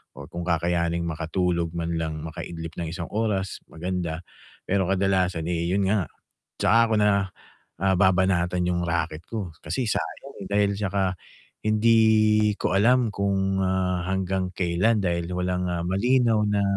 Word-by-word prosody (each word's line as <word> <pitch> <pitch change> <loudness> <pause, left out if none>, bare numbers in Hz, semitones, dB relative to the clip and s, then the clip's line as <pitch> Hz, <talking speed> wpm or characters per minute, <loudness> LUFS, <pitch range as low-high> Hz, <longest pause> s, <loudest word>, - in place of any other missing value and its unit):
o - - -9
kung 85 - -5
kakayanin 85 0 0
makatulog 85 +1 -1
man 85 0 -2
lang, 80 -1 -4
makaidlip 80 0 -7
ng 85 - -2
1 85 -1 -5
oras 105 -3 -1
maganda. 85 -1 -4 0.4
Pero 95 -1 +1
kadalasan, 95 -3 +1
eh, 85 -1 -1
yun 95 +2 +1
nga, 100 -4 +1 0.5
'tsaka 115 - +4
'ko - - +4
na, 105 0 +4 0.7
ah, 95 -1 +3
babanatan 90 -2 +2
yung 85 0 0
raket 80 -1 -2
ko 105 -7 -4
kasi 125 -4 -1
sayang, 140 +5 -4
eh, - - -7
dahil 100 -1 +2
'tsaka 95 -2 0 0.5
hindi 110 -1 +4
ko 95 - 0
alam 120 +3 +4
kung, 95 -1 0
ah, 90 -1 0
hanggang 95 -1 -1
kailan 95 +5 +1
dahil 85 -2 0
walang, 90 0 -1
ah, 85 -1 -2
malinaw 115 +4 +2
na 105 -1 +1
95 Hz, 145 wpm, -25 LUFS, 85-100 Hz, 0.7 s, tsaka